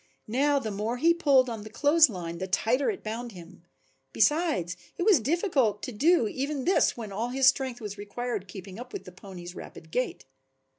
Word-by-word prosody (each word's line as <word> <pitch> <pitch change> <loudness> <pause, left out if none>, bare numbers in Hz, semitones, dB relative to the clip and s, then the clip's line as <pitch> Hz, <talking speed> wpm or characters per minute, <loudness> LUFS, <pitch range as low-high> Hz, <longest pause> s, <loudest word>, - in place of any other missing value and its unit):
Now 280 +6 +2
the 225 -6 -2
more 215 +4 -2
he 335 +6 +4
pulled 280 -6 +4
on 225 -3 -5
the 215 - -9
clothes 295 +6 +5
line 170 -4 -6
the 190 - -3
tighter 230 - +1
it 405 - -4
bound 230 +2 -5
him. 175 -1 -13 0.5
Besides 295 - +2 0.2
it - - -1
was 390 -6 +5
difficult 270 - +1
to 255 - -4
do 285 +3 +3
even 275 +4 -3
this 370 -7 +3
when 220 -3 -6
all 225 +5 -2
his 265 +1 +1
strength 260 -1 +3
was 210 -2 -7
required 205 0 -4
keeping 190 +2 -9
up 250 +1 -9
with - - -5
the 180 - -10
pony's 180 -1 -10
rapid 160 -3 -11
gait. 250 +6 -2
235 Hz, 195 wpm, -28 LUFS, 200-280 Hz, 0.5 s, clothes